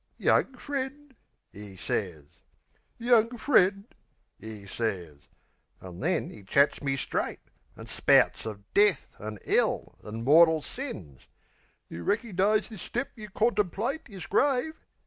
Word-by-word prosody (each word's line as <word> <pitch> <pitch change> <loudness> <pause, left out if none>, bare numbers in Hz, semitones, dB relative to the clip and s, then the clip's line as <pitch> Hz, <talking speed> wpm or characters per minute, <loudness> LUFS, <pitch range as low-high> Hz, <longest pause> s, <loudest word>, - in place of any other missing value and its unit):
"Young 265 - +2
friend," 280 0 -5 0.4
'e 100 -1 -10
sez. 90 -5 -3 0.7
"Young 235 0 +3
friend," 200 -6 +3 0.6
'e 110 -1 -9
sez. 95 -9 -4 0.6
An' 90 -2 -10
then - - -1
'e 105 - -12
chats 140 +9 +2
me 135 -2 0
straight; 135 - -2 0.4
An' - - -9
spouts - - +3
of 105 -2 -7
death, 200 -6 +3
an' 105 0 -6
'ell, - - 0
an' 110 +2 -6
mortal 160 +3 +6
sins. 95 - -8 0.6
"You 85 - -8
reckernize 210 -1 +1
this 215 -5 -9
step 245 +3 -3
you 215 -3 -9
contemplate 210 - -1
Is 195 -3 -8
grave? 275 +7 +1
190 Hz, 125 wpm, -28 LUFS, -, 0.7 s, mortal